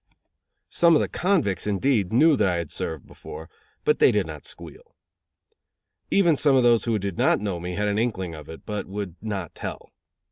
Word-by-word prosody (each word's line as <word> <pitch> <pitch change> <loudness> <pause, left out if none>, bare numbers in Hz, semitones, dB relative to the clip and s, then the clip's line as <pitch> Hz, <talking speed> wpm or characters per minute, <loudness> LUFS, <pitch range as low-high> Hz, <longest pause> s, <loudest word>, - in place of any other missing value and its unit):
Some 170 -1 +4
of - - +4
the - - 0
convicts, 170 - 0
indeed, 105 -1 +1
knew 150 +7 +5
that 105 -6 +2
I 90 - +1
had 85 -3 -4
served 80 -4 -4
before; 80 +2 -11 0.3
but 450 0 +2
they - - +6
did - - +1
not - - -7
squeal. 485 -1 -11 1.1
Even 175 -5 +4
some 140 -1 +3
of 130 - +4
those 120 -2 +4
who 115 -2 +1
did 100 -3 -4
not - - +3
know 100 -4 -3
me 90 +1 -5
had 105 +2 -1
an 105 +1 0
inkling 95 -7 -2
of 75 -1 -10
it, 80 - -10
but 105 -1 -4
would 100 -3 -5
not 100 -6 -4
tell. - - -7
105 Hz, 200 wpm, -24 LUFS, 90-135 Hz, 1.1 s, they